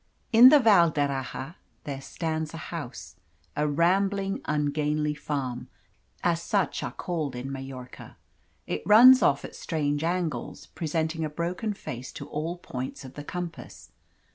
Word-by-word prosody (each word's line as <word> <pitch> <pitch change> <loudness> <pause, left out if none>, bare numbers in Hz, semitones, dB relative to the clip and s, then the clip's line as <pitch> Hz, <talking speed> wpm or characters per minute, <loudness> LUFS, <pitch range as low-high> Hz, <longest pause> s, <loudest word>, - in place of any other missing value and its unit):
In 240 +3 +10
the 300 - +8
Val 200 -9 +6
d'Erraha 140 +1 -3 0.3
there 140 -2 -5
stands 160 +1 -4
a - - -8
house - - -7 0.4
a 150 +1 +1
rambling, 195 +5 +1
ungainly 150 0 0
Farm, 140 -5 -4 0.6
as 170 -1 +1
such 195 +2 0
are - - -4
called 155 -7 -3
in 125 +2 -5
Majorca. 135 -2 -9 0.5
It - - -3
runs 250 +5 +8
off 140 -1 +2
at - - -10
strange 145 -2 -2
angles, 165 -7 -2
presenting 160 0 -2
a 155 - -1
broken 180 +7 -3
face 130 -7 -7
to - - -8
all 160 +4 -3
points 130 -5 -6
of 130 - -10
the 145 - -8
compass. 175 +2 -7
155 Hz, 140 wpm, -27 LUFS, 140-175 Hz, 0.6 s, In